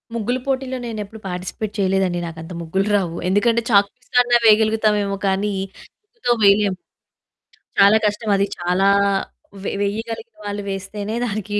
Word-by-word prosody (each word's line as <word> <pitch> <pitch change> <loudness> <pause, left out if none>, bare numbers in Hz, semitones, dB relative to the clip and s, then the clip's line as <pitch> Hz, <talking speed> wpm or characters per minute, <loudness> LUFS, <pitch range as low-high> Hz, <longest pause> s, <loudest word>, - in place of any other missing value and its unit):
ముగ్గుల 235 +3 -1
పోటీలో 260 -1 -1
నేనెప్పుడు 220 -1 -6
పార్టిసిపేట్ 190 +4 -5
చేయలేదండి. 190 -2 +1
నాకు 165 -1 -9
అంత 165 +2 -9
ముగ్గులు 190 +5 -1
రావు. 175 -4 -1
ఎందుకంటే, 230 +4 +2
చాక్ 200 -2 +5
పీస్ 250 - -31 0.4
వేయగలుగుతామేమో 215 -2 +3
కానీ 195 +2 0 0.5
ముగ్గుతో 435 - -3
వేయలేము. 200 -1 +4 1.0
చాలా 200 +2 +7
కష్టమది. 205 -1 +1
చాలా 180 +2 +1 0.8
వె - - -1
వెయ్యగలిగిన 225 +2 -4
వాళ్ళు 205 0 -3
వేస్తేనే 200 +2 -5
దానికి 205 -1 -3
205 Hz, 125 wpm, -20 LUFS, 195-220 Hz, 1.0 s, చాలా